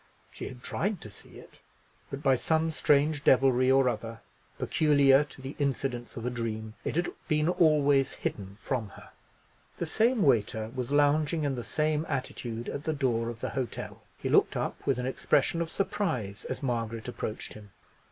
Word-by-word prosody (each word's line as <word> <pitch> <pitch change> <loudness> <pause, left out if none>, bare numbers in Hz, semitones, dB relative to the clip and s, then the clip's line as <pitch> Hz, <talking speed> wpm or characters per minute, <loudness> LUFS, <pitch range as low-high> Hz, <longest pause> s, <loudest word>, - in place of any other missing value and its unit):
She - - -7
had 125 -1 -10
tried 200 +1 -1
to 105 - -9
see - - -14
it; - - -15 0.5
but 140 +2 -6
by 135 - +5
some 160 +5 +1
strange 150 -1 +2
devilry 130 -1 +4
or 135 0 +5
other, 115 -1 -3 0.4
peculiar 145 -3 +4
to 135 -2 -13
the 135 +2 -6
incidents 130 -4 -2
of 115 - -5
a 125 - -1
dream, 110 -2 -4
it - - -3
had 175 +1 0 0.2
been 150 -1 +2
always 145 -6 +3
hidden 100 -1 -5
from 120 -6 -2
her. - - -13 0.7
The - - -2
same 225 +7 +2
waiter 110 -4 +2
was 125 -2 -3
lounging 145 +2 +2
in 140 -2 0
the 120 -2 -4
same 155 +3 0
attitude 120 -3 -4
at 140 - -5
the 160 - 0
door 120 -5 0
of 115 -1 -8
the - - -2
hotel. 130 -4 -4 0.2
He - - -4
looked - - +3
up - - -3
with 135 -3 +2
an 125 - -2
expression 150 +5 +1
of 165 - -2
surprise 145 - -2
as - - -5
Margaret 115 -3 -2
approached 110 -3 -5
him. 105 -1 -12
135 Hz, 180 wpm, -29 LUFS, 115-150 Hz, 0.7 s, by